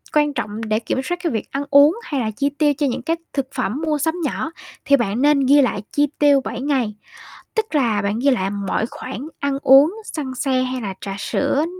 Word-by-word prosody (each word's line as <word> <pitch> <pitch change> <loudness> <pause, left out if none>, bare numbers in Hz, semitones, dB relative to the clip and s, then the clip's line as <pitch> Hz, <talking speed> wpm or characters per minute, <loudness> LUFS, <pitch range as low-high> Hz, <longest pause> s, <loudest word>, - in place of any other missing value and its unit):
quan 295 -1 +3
trọng 220 -4 -4
để 215 0 0
kiểm 240 +3 -2
soát 350 +6 -2
cái 335 - 0
việc 220 -3 -4
ăn 275 +1 -2
uống 290 +4 +6
hay 280 - -2
là 220 -2 -1
chi 280 +6 -1
tiêu 295 -2 +3
cho 290 -2 +1
những 255 0 -2
cái 325 +7 0 0.2
thực 275 -2 -1
phẩm 250 +2 -2
mua 305 -1 +1
sắm 320 +3 0
nhỏ 300 +3 -2 0.3
thì 280 - +5
bạn 235 -1 -1
nên 295 0 +4
ghi 285 +2 +6
lại 245 -6 0
chi 290 0 +2
tiêu 285 -2 +5
7 240 - -4
ngày. 260 -7 0 0.6
Tức 440 -6 -1
là 230 -7 +2
bạn 205 +2 -1
ghi 275 +3 +3
lại 195 -7 0 0.2
mọi 215 - 0
khoản 260 +2 -7
ăn 280 -1 -1
uống, 280 +8 +6
xăng 280 -8 -5
xe 255 0 0
hay 255 0 -3
là 200 -3 -4
trà 195 -1 -5
sữa, 280 +7 0
270 Hz, 230 wpm, -20 LUFS, 235-290 Hz, 0.6 s, uống